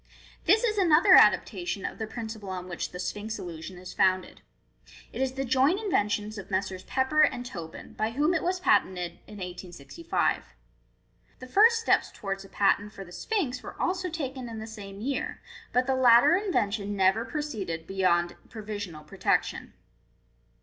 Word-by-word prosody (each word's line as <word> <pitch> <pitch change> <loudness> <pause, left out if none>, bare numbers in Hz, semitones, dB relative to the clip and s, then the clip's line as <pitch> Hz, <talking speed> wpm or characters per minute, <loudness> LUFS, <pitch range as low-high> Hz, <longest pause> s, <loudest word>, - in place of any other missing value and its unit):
— - - -25
This 425 +7 +5
is 430 -3 +1
another 360 +1 +6
adaptation 350 - +4
of - - -5
the 220 - -3
principle 220 -3 -7
on 185 -1 -5
which 175 -1 -4
the 180 - -9
Sphinx 210 +4 -4
illusion 175 +1 -8
is 180 0 -9
founded. 185 -1 +1 0.7
It - - -4
is 265 -1 0
the 270 0 -3
joint 265 - +3
invention 210 - 0
of 195 - -10
Messrs. 190 -1 -2
Pepper 265 +4 +2
and 245 -5 +2
Tobin, 170 -9 -8
by 215 - -1
whom 295 +9 +1
it 330 - +1
was 365 +1 -1
patented 180 - +1
in 210 - -11
1865. 180 - -3 0.8
The 255 - -10
first 440 - +5
steps - - +2
towards 195 -1 -5
a 195 - -14
patent 205 +1 +1
for 195 - -9
the 175 - -14
Sphinx 300 - -2
were - - -10
also 365 0 -1
taken 265 -6 -5
in 225 - -7
the 220 - -6
same 205 -3 -9
year, 270 +4 -3 0.3
but 250 +1 +2
the 265 - +1
latter 245 +4 +6
in 395 +1 -1
vention 205 - -1
never 195 +3 +3
proceeded 210 - -4
be 195 - -8
yor 175 -2 +3 0.2
provisional 205 -8 -6
protection. 150 - -1
220 Hz, 170 wpm, -28 LUFS, 190-295 Hz, 0.8 s, another